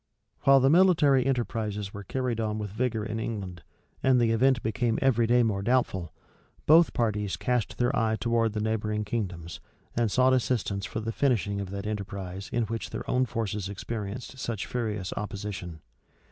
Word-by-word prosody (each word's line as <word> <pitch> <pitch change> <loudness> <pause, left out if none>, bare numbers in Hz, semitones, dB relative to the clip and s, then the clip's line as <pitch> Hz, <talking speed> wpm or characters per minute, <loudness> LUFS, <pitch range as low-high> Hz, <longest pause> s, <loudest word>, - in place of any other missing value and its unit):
While 135 0 +7
the 135 - +5
military 150 -7 +5
enterprises 110 -6 -2
were 100 - -7
carried 125 +2 -2
on 110 -1 -1
with 105 -2 -4
vigor 110 -1 -1
in 110 0 -3
England, 95 -7 -5 0.4
and 130 -1 +4
the 115 -1 +3
event 125 +2 +3
became 115 +1 0
every 120 -4 +3
day 120 +1 +4
more 105 -4 0
doubtful, 100 -6 0 0.5
both 160 +2 +6
parties 105 -5 0
cast 115 +2 -1
their 120 +3 +1
eye 110 -2 +2
towards 115 -2 +1
the 105 - -1
neighboring 105 -1 -1
kingdoms, 95 -7 -4 0.4
and 115 -1 +2
sought 130 +4 +4
assistance 110 -6 0
for 110 - -4
the 115 +1 -3
finishing 110 -6 0
of 100 - -5
that 100 +1 -5
enterprise 100 -2 -5
in 120 -1 +1
which 115 +1 -4
their - - -6
own 130 0 +2
forces 105 -4 -3
experienced 110 +5 -6
such 115 -5 -3
furious 105 -6 -3
opposition. 100 -6 -5
110 Hz, 170 wpm, -28 LUFS, 100-125 Hz, 0.5 s, While